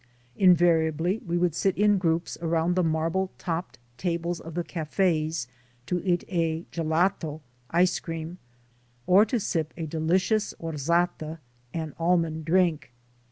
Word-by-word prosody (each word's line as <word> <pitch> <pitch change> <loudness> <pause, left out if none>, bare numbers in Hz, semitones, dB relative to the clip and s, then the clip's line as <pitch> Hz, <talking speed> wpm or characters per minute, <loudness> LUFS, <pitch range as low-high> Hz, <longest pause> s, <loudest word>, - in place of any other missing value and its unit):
Invariably 175 0 +3
we 175 -3 -2
would 175 -2 +1
sit 190 +3 0
in 205 0 +4
groups 165 -1 0
around 165 +1 +1
the 185 - +3
marble 165 +4 0
topped 170 0 -4 0.2
tables 170 -1 -1
of 165 0 -9
the 175 - -1
cafes 160 -4 -1 0.4
to 180 +6 -1
eat 175 -2 +1
a 165 -2 -1
"gelato" 160 -1 0 0.3
(ice 180 +2 +3
cream), 165 +1 -6 0.7
or 195 +4 +6
to 230 +2 -1
sip 165 -6 -2
a 165 - -3
delicious 185 +7 0
"orzata" 165 +1 -1 0.3
an 160 -3 -4
almond 165 -2 +1
drink. 170 -5 +2
170 Hz, 130 wpm, -26 LUFS, 160-180 Hz, 0.7 s, or